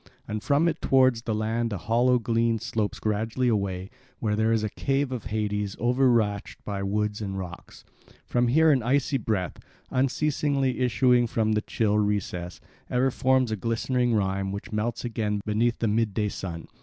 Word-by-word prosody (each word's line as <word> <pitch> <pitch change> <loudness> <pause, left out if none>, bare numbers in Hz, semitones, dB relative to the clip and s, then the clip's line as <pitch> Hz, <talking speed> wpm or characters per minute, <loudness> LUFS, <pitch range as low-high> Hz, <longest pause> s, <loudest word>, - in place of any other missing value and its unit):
And 105 0 -3
from 145 +7 +2
it 165 - -1
towards 130 -3 +4
the 115 -2 -2
land 115 +2 -1
a 100 - -2
hollow 120 +5 +2
glen 115 0 +1
slopes 110 -1 -2
gradually 110 +4 -1
away, 100 -4 -1 0.3
where 105 -2 -1
there 110 +1 +2
is 110 -1 +1
a 110 - -1
cave 135 0 -1
of 125 -5 -4
Hades 105 -2 -2
overarched 120 -4 +1
by 100 -1 -3
wood 105 +2 -1
and 95 -2 -4
rocks. 90 -2 -8 0.4
From 120 0 +1
here 160 +6 +5
an 135 -3 +3
icy 135 +3 +1
breath, 100 -7 -2 0.3
unceasingly 135 0 0
issuing 125 -1 +3
from 110 -1 0
the 105 0 +1
chill 105 -1 0
recess, 95 -4 -2 0.3
ever 130 +2 +2
forms 130 -2 +2
a - - +1
glistening 115 +3 0
rime 95 -1 0
which 100 +3 -6
melts 110 +3 -2
again 105 -3 -1
beneath 115 +3 +1
the 115 - 0
midday 105 -1 0
sun. 85 -4 -6
115 Hz, 170 wpm, -26 LUFS, 105-125 Hz, 0.4 s, here